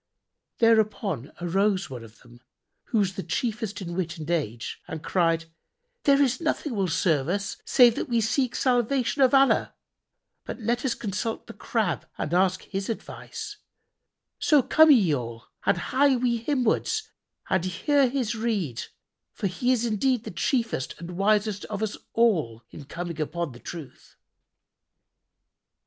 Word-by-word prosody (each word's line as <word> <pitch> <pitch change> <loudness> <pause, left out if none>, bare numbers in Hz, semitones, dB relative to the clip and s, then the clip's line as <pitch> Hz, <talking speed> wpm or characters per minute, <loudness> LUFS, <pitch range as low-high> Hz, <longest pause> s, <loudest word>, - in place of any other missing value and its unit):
Thereupon 215 - +2
arose 195 +1 +1
one 125 -3 -7
of 110 -1 -15
them, 120 0 -17 0.4
who 230 - -1
was 195 -3 +2
the 190 - -4
chiefest 220 -2 -3
in 175 -1 -5
wit 175 -1 -3
and 160 +1 -5
age, 120 -9 -2
and 160 -3 -6
cried, 165 -2 +1 0.6
"There 280 -1 +5
is 275 +1 +2
nothing 310 -3 -1
will 195 -4 0
serve 160 -4 +1
us 195 +2 -2
save 245 -3 +6
that - - -3
we 235 -1 +2
seek 235 +3 0
salvation 255 +2 +1
of 260 -2 +6
Allah; 270 0 +3 0.7
but - - -7
let 235 +2 -1
us 260 -3 0
consult 215 +1 -3
the - - -10
Crab - - -2
and 150 - -3
ask 185 +1 +2
his 195 +1 -4
advice: 410 - -6 0.8
so 295 -4 +4
come 315 +5 +6
ye 215 - +6
all[FN#76] 115 -4 -3 0.2
and - - +4
hie 270 +9 +2
we 240 -1 +1
himwards 295 - 0 0.4
and 190 -2 +2
hear 265 - +2
his 245 -4 -1
rede 210 - -2 0.5
for - - -5
indeed 225 +2 0
he - - +5
is 240 - -7
the - - -6
chiefest 235 - -1
and 170 +1 -8
wisest 205 +1 +1
of 210 0 -4
us 215 - -2 0.2
all 160 - +2
in 145 - -10
coming 170 +1 -5
upon 155 +1 -3
the 120 - -12
truth." 160 -3 -10
205 Hz, 155 wpm, -26 LUFS, 170-245 Hz, 0.8 s, save